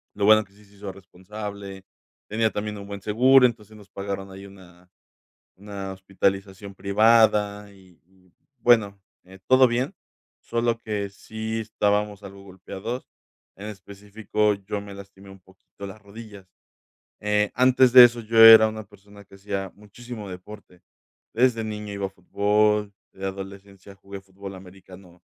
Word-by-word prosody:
lo 100 - -1
bueno 110 +1 +6
que 100 - -28
sí 105 +1 -21
se 100 0 -23
hizo 100 -1 -8
responsable, 100 +1 -9 0.5
tenía 110 +1 +1
también 105 0 -5
un 100 0 -10
buen 100 -1 -8
seguro, 125 +6 +5
entonces, 110 -3 -3
nos 105 -1 -17
pagaron 100 0 -6
ahí 95 +1 -11
una 90 -2 -18 0.7
una 100 -1 -7
hospitalización 95 +1 -3
privada 105 0 +2
y 95 -3 -21
y, 90 0 -29 0.3
bueno, 110 -4 +2 0.3
eh, 95 +1 -16
todo 130 0 +6
bien, 125 +8 -2 0.5
solo 115 0 -1
que 105 -3 -4
sí 110 +2 -6
estábamos 105 -1 -1
algo 100 0 -12
golpeados, 100 +5 -8 0.5
en 100 +2 -9
específico, 105 +1 -3
yo 100 +1 -6
me 100 0 -11
lastimé 100 0 -14
un 95 0 -14
poquito 95 +2 -15
las 105 +2 -12
rodillas. 100 -2 -13 0.7
Eh, 105 0 0
antes 130 0 +4
de 125 -1 +11
eso, 120 0 +2
yo 115 0 -2
era 110 -1 +10
una 110 0 -7
persona 100 0 -18
que 100 - -17
hacía 95 -1 -5
muchísimo 105 +1 -11
deporte. 90 0 -12 0.5
Desde 115 -1 +2
niño 105 -1 -6
iba 100 -1 -3
a - - -9
fútbol, 105 +2 0 0.2
de 95 - -10
adolescencia 100 0 -9
jugué 100 0 -11
fútbol 95 0 -11
americano, 95 -1 -15
100 Hz, 150 wpm, -24 LUFS, 95-110 Hz, 0.7 s, de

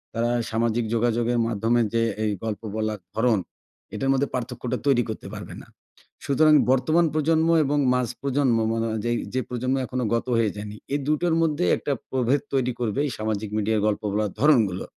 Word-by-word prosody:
তারা 120 +1 +1 0.2
সামাজিক 115 +1 0
যোগাযোগের 120 +1 +1
মাধ্যমে 115 +2 +1
যে, 115 - +2 0.2
এই 105 - +1
গল্প 110 -2 -3
বলার 110 -1 -2 0.2
ধরন 110 -2 +2 0.6
এটার 135 - -1
মধ্যে 135 +1 +1
পার্থক্যটা 125 0 -3
তৈরি 120 -3 +4
করতে 110 - -6
পারবে - - -8
না। - - -15 0.6
সুতরাং 155 +2 +4 0.2
বর্তমান 155 +6 +3
প্রজন্ম 160 +1 +2 0.2
এবং 145 +2 0 0.2
মাঝপ্রজন্ম 125 +1 0
ম - - +1
মনো 115 0 -1 0.2
যেই, 120 0 +1 0.2
যে 130 - +1
প্রজন্ম 125 +2 -1
এখনও 125 -1 -2
গত 115 - -2
হয়ে 110 -3 +2
যায়নি। 105 0 -7 0.2
এই 145 - +1
২ 150 - +3
টোর 175 -2 +2
মধ্যে 150 - +1
একটা 145 - -3 0.2
প্রভেদ 130 +2 +1
তৈরি 130 -2 +1
করবে 120 +1 -1
এই - - -4
সামাজিক 110 -1 -2
মিডিয়ার 110 0 +1
গল্প 105 - 0
বলার 105 -1 0
ধরনগুলো। 115 -11 +3
120 Hz, 175 wpm, -24 LUFS, 110-135 Hz, 0.6 s, তৈরি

